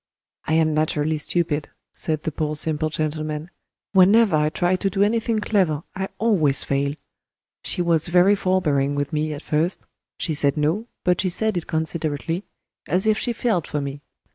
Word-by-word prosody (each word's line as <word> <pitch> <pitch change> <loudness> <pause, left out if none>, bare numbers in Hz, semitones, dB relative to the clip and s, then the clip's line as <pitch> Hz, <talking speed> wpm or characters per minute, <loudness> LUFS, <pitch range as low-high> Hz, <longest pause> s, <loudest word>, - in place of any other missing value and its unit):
I 155 - -1
am 160 -1 +3
naturally 155 0 0
stupid," 155 -1 -1 0.2
said 155 -2 -2
the 160 - -2
poor 155 0 -2
simple 155 +1 0
gentleman; 155 +1 -3 0.4
"whenever 200 0 +5
I 150 0 +2
try 175 +3 +1
to 195 - 0
do 195 +1 +1
anything 225 +1 +1
clever 185 -8 +1
I 190 +1 -3
always 170 - +2
fail. 140 +1 -1 0.7
She 180 - -1
was 165 -2 +2
very 180 +3 +5
forbearing 155 -8 +1
with 145 +1 -2
me 155 0 0
at 150 0 -6
first; 160 +4 0 0.3
she 160 - -2
said 140 0 +2
No, 165 +10 0 0.2
but 180 -1 +2
she 185 - 0
said 220 +3 -1
it 175 - -3
considerately, 160 +2 -2 0.4
as 185 +3 +1
if 215 0 +3
she 245 - -1
felt 220 -8 0
for 150 - -2
me. 140 0 -5
160 Hz, 170 wpm, -23 LUFS, 150-185 Hz, 0.7 s, whenever